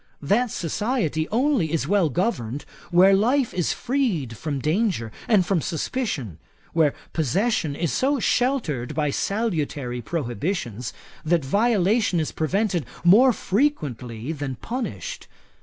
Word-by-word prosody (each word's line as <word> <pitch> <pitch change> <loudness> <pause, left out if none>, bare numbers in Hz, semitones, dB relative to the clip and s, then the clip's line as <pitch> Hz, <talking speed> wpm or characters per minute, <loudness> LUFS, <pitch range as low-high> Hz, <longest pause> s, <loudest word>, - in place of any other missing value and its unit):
That 225 - +2
society 170 - -1
only 240 - +1
is 165 - 0
well 195 -5 +3
governed, 145 - -2 0.2
where 185 +3 +6
life 240 +6 +2
is 175 -3 0
freed 230 - -1
from 145 +5 -3
danger 155 - 0 0.2
and 205 -6 +4
from 185 -4 +1
suspicion; 160 - -3 0.3
where 160 -4 +3 0.2
possession 160 - 0
is 170 0 -1
so 275 +1 +1
sheltered 215 - 0
by 150 -2 +1
salutary 150 - -2
prohibitions, 125 - -3 0.3
that 160 -2 +1
violation 205 - +2
is 155 - -1
prevented 180 - 0 0.2
more 230 +9 +7
frequently 150 - -1
than 145 -4 -4
punished. 240 - -5
175 Hz, 120 wpm, -24 LUFS, 145-225 Hz, 0.3 s, more